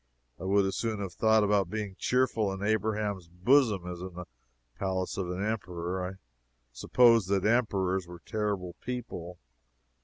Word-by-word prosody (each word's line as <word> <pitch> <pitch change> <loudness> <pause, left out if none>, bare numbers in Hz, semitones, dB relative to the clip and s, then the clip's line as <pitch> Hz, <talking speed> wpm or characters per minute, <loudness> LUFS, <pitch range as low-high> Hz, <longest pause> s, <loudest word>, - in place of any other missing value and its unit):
I 95 - -6
would 100 +1 +3
as 95 - -1
soon 110 -3 -1
have 95 -3 -4
thought 110 +1 +4
of 100 -3 +2
being 105 -1 -4
cheerful 125 -5 +1
in 95 +1 -5
Abraham's 105 -3 0
bosom 105 +2 +3
as 90 -1 -6
in 90 -1 -7
the 90 0 -6 0.5
palace 95 -1 -1
of 95 -3 -3
an 90 +3 -2
Emperor. 90 -4 -3
I 90 +1 -4 0.6
supposed 115 - +4
that 100 -1 +1
Emperors 95 -6 +1
were 90 0 -10
terrible 105 -5 -2
people. 110 -8 -5
100 Hz, 155 wpm, -29 LUFS, 90-110 Hz, 0.6 s, thought